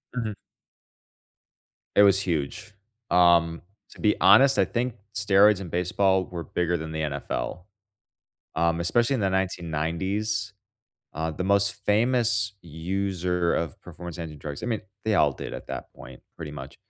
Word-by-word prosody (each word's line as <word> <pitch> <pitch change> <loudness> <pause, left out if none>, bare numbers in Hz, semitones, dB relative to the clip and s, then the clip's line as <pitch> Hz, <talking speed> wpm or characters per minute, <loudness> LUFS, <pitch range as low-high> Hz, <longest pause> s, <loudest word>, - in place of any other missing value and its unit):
Mhm. 115 -4 -2 1.6
It 100 - +7
was 100 -1 +5
huge. 85 +2 -3 0.4
Um, 85 -2 +4 0.3
to - - -15
be 105 -1 +3
honest, 125 +9 +7
I 100 - +4
think 120 +4 -2 0.2
steroids 100 0 +4
in 95 - -6
baseball 95 +2 +1
were 85 -2 -6
bigger 85 +1 -1
than 80 0 -6
the 80 0 -3
NFL, 70 +2 -3 0.9
um, 85 0 +1
especially 120 +9 +2
in - - -2
the 95 - +2
1990s. 95 +3 -2 0.6
Uh, 80 +1 -2
the 85 +4 -4
most 100 +1 +2
famous 110 -2 +2
user 90 +1 -1
of 85 -5 -2
performance-enhancing 85 -3 -8
drugs 70 0 -7
I - - -1
mean, 115 -3 -1 0.2
they 110 - +2
all 75 -6 +4
did - - -7
at - - -8
that - - -7
point, 65 -1 -12
pretty 75 -2 -7
much, 75 - -9
90 Hz, 145 wpm, -26 LUFS, 80-100 Hz, 1.6 s, It